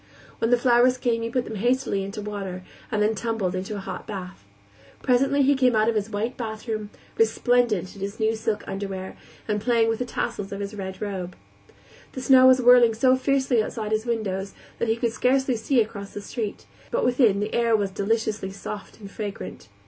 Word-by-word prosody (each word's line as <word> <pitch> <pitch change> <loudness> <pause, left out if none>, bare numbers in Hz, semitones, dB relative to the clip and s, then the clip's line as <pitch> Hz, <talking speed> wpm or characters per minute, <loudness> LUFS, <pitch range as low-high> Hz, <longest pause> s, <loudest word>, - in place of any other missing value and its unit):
When 225 - +1
the 245 - +5
flowers 245 +1 +4
came 235 -2 0
he 230 - -2
put 250 0 -1
them 220 - -6
hastily 240 -2 +1
into 200 +2 -6
water, 195 -3 -5 0.3
and 210 -1 +1
then 215 +1 +2
tumbled 220 -4 -2
into 190 +3 -4
a - - -4
hot 190 -1 -7
bath. 190 - -7 0.6
Presently 275 +2 +3
he 280 +2 +5
came 255 -3 +3
out 215 0 +3
of - - +1
his 215 0 -1
white 220 +4 -2
bathroom, 220 -2 -4 0.3
resplendent 225 -4 +2
in 200 - -12
his 200 +1 -5
new 220 0 +2
silk 220 -1 -2
underwear, 195 -1 -5 0.3
and 210 -1 -1
playing 230 0 +3
with 225 - -1
the 250 - -1
tassels 205 -4 -3
of 200 - -5
his 200 +1 -4
red 190 -1 -6
robe. 185 -3 -4 0.8
The 260 - -5
snow 260 -1 +7
was 260 0 +6
whirling 245 -2 +6
so 255 +3 +4
fiercely 265 -3 +2
outside 215 0 -4
his 220 +2 0
windows 200 -4 -2 0.2
that 235 - 0
he 225 - +2
could 235 -1 -1
scarcely 260 +1 +2
see 240 +3 +1
across 200 -2 -5
the 205 - -4
street, 205 - -5 0.2
but - - 0
within 245 -5 +3
the 210 +1 -3
air 235 -1 +3
was 200 -2 0
deliciously 210 0 -1
soft 200 +2 -8
and 200 -2 -10
fragrant. 205 - -7
220 Hz, 200 wpm, -25 LUFS, 200-245 Hz, 0.8 s, snow